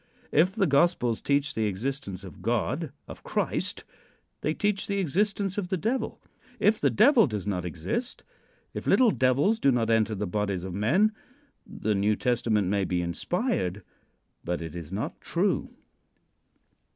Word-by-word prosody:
If 180 Hz, +6 st, +3 dB
the 210 Hz, -4 st, +3 dB
gospels 140 Hz, -6 st, +2 dB
teach 140 Hz, 0 st, +1 dB
the 110 Hz, -, 0 dB
existence 105 Hz, -1 st, -4 dB
of 90 Hz, -2 st, -11 dB
God 125 Hz, -, -1 dB, 0.2 s
of -, -, -10 dB
Christ -, -, -2 dB, 0.6 s
they 155 Hz, -, 0 dB
teach 205 Hz, +4 st, 0 dB
the 200 Hz, -, -1 dB
existence 195 Hz, +3 st, 0 dB
of 190 Hz, -, -3 dB
the 190 Hz, 0 st, -1 dB
Devil. 225 Hz, +6 st, -2 dB, 0.4 s
If 215 Hz, +1 st, +3 dB
the -, -, +4 dB
Devil 230 Hz, -, +5 dB
does 105 Hz, -5 st, -4 dB
not 90 Hz, -4 st, -2 dB
exist 90 Hz, -, -4 dB, 0.5 s
if -, -, -6 dB
little 245 Hz, -4 st, +5 dB
devils 140 Hz, -, +2 dB
do 140 Hz, -, +4 dB
not 115 Hz, -2 st, +1 dB
enter 110 Hz, -1 st, +2 dB
the 105 Hz, +1 st, -2 dB
bodies 100 Hz, -1 st, -2 dB
of 95 Hz, -1 st, -5 dB
men 155 Hz, -, +3 dB, 0.6 s
the 110 Hz, -, -2 dB
New 105 Hz, +2 st, +2 dB
Testament 115 Hz, -4 st, +1 dB
may 100 Hz, +1 st, +1 dB
be 90 Hz, -1 st, -1 dB
inspired, 100 Hz, -, -1 dB, 0.6 s
but 90 Hz, 0 st, -2 dB
it 80 Hz, -1 st, -7 dB
is 85 Hz, -2 st, -7 dB
not 100 Hz, +3 st, -4 dB
true. -, -, 0 dB
125 Hz, 155 wpm, -27 LUFS, -, 0.6 s, Devil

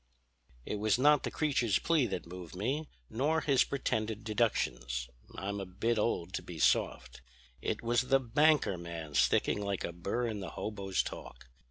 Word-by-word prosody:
"It 105 Hz, -, -3 dB
was 105 Hz, +1 st, +2 dB
not 145 Hz, +2 st, +5 dB
the -, -, -2 dB
creature's 135 Hz, -9 st, +1 dB
plea 160 Hz, -7 st, +2 dB
that 95 Hz, -, -4 dB
moved 90 Hz, 0 st, -9 dB
me, 135 Hz, +11 st, -2 dB, 0.2 s
nor 150 Hz, -, +1 dB
his 135 Hz, -4 st, +4 dB
pretended 110 Hz, -5 st, -2 dB
deductions; 60 Hz, -, 0 dB, 0.3 s
I'm 100 Hz, +1 st, -3 dB
a 100 Hz, -, -4 dB
bit 110 Hz, +5 st, 0 dB
old 95 Hz, -5 st, -1 dB
to -, -, -2 dB
be 85 Hz, -, -9 dB
soft. -, -, +1 dB, 0.4 s
It -, -, -2 dB
was 120 Hz, +1 st, +3 dB
the 135 Hz, +2 st, +3 dB
'banker 135 Hz, -, +3 dB
man' 85 Hz, -3 st, -7 dB
sticking 65 Hz, +10 st, +3 dB
like 100 Hz, -2 st, -2 dB
a 85 Hz, -, -3 dB
bur 100 Hz, +8 st, -2 dB
in 110 Hz, -3 st, -3 dB
the 95 Hz, -3 st, -5 dB
hobo's 100 Hz, -2 st, -2 dB
talk. -, -, -9 dB
105 Hz, 170 wpm, -32 LUFS, 90-125 Hz, 0.4 s, not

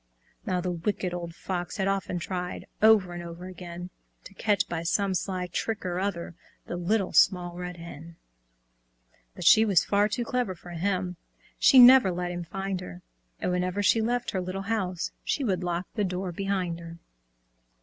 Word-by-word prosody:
Now, 180 Hz, -1 st, 0 dB
the 180 Hz, 0 st, -2 dB
Wicked 180 Hz, +1 st, -2 dB
Old 170 Hz, -1 st, -5 dB
Fox 175 Hz, 0 st, -4 dB
had 195 Hz, -1 st, 0 dB
often 195 Hz, -2 st, -1 dB
tried 180 Hz, 0 st, -4 dB, 0.2 s
Over 210 Hz, -5 st, +5 dB
and 175 Hz, -, -5 dB
over 170 Hz, +1 st, -8 dB
again, 180 Hz, -1 st, -8 dB, 0.3 s
To -, -, -12 dB
catch 205 Hz, 0 st, +1 dB
by 170 Hz, -1 st, -3 dB
some 195 Hz, +3 st, +1 dB
sly 185 Hz, 0 st, -2 dB
trick 205 Hz, +4 st, -3 dB
or 180 Hz, 0 st, -1 dB
other 180 Hz, -3 st, -3 dB, 0.3 s
The -, -, -5 dB
Little 190 Hz, +3 st, 0 dB
Small 180 Hz, -2 st, +4 dB
Red 180 Hz, 0 st, -6 dB
Hen. 170 Hz, 0 st, -10 dB, 1.2 s
But -, -, -6 dB
she 220 Hz, -, +8 dB
was 200 Hz, -6 st, +3 dB
far 205 Hz, +1 st, +2 dB
too 240 Hz, +2 st, -2 dB
clever 245 Hz, -6 st, -1 dB
for 175 Hz, +1 st, -12 dB
him, 180 Hz, 0 st, -2 dB, 0.4 s
She 270 Hz, -, +6 dB
never 250 Hz, -5 st, +9 dB
let 175 Hz, 0 st, -3 dB
him 175 Hz, 0 st, -4 dB
find 195 Hz, +2 st, -4 dB
her, 90 Hz, -, -9 dB, 0.4 s
And -, -, -1 dB
whenever 180 Hz, +2 st, -1 dB
she 225 Hz, +3 st, +4 dB
left 240 Hz, +2 st, -1 dB
her 190 Hz, -, -1 dB
little 185 Hz, +2 st, -4 dB
house 190 Hz, -5 st, -2 dB
She 285 Hz, -, -1 dB
would 190 Hz, -7 st, 0 dB
lock 175 Hz, 0 st, -2 dB
the 210 Hz, -, 0 dB
door 185 Hz, -1 st, -2 dB
behind 185 Hz, -2 st, -2 dB
her. 170 Hz, 0 st, -9 dB
185 Hz, 180 wpm, -27 LUFS, 175-200 Hz, 1.2 s, never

